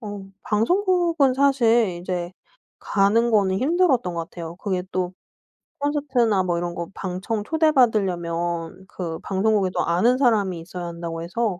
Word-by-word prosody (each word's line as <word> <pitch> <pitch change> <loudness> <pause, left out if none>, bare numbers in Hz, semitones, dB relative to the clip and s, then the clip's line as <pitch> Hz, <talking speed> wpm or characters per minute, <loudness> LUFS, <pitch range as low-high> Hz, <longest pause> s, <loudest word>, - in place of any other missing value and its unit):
어 205 -3 -7 0.2
방송국은 335 - +2
사실 240 -8 +3
이제 180 0 -4 0.5
가는 210 +4 +2
거는 195 -4 +2
힘들었던 270 - +2
것 165 0 -4
같아요. 170 -1 -8
그게 185 -1 -2
또 180 0 -1 0.7
콘서트나 260 -8 +1
뭐 175 -2 -1
이런 175 0 -3
거 170 -1 -4
방청 195 +4 -3
초대받으려면 190 - 0
그 170 -4 -5
방송국에 195 -1 +1
또 - - 0
아는 190 +10 +2
사람이 210 -9 +2
있어야 175 +1 -7
한다고 170 -1 -6
해서 190 +1 -2
195 Hz, 305 characters per minute, -23 LUFS, 175-240 Hz, 0.7 s, 사실